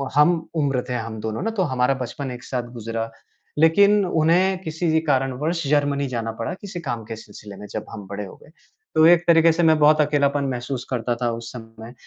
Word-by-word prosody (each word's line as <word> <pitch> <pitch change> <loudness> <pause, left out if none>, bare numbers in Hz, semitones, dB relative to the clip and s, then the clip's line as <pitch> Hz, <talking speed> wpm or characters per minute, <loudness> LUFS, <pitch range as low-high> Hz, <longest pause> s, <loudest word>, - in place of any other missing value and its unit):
हम 165 +4 +5 0.2
उम्र 140 -5 +1
थे 125 - -2
हम 115 -2 -4
दोनों 110 0 -3
ना 225 - -1
तो 210 -4 0
हमारा 130 -3 +1
बचपन 135 +3 -5
एक 120 -1 -8
साथ 125 -2 -4
गुजरा। 115 -1 -4 0.5
लेकिन 200 +5 +5
उन्हें 175 +3 +2
किसी 160 0 0
कारणवश 145 +4 0
जर्मनी 140 -1 +1
जाना 115 -3 -3
पड़ा 115 +5 -4
किसी 190 -3 -7
काम 120 -7 -4
के 115 - -6
सिलसिले 105 -2 -12
में। 105 +1 -10
जब 110 - -5
हम 100 - -8
बड़े 100 +1 -5
हो 95 - -11
गए - - -18 0.5
तो 155 0 +6
एक 175 0 +5
तरीके 165 0 +6
से 170 +2 0
मैं 160 -1 +5
बहुत 155 +1 +5
अकेलापन 145 -1 +1
महसूस 125 0 -4
करता 120 -1 -1
था 120 - +1
उस 115 0 -6
समय। 115 0 -11
135 Hz, 205 wpm, -22 LUFS, 115-160 Hz, 0.5 s, तो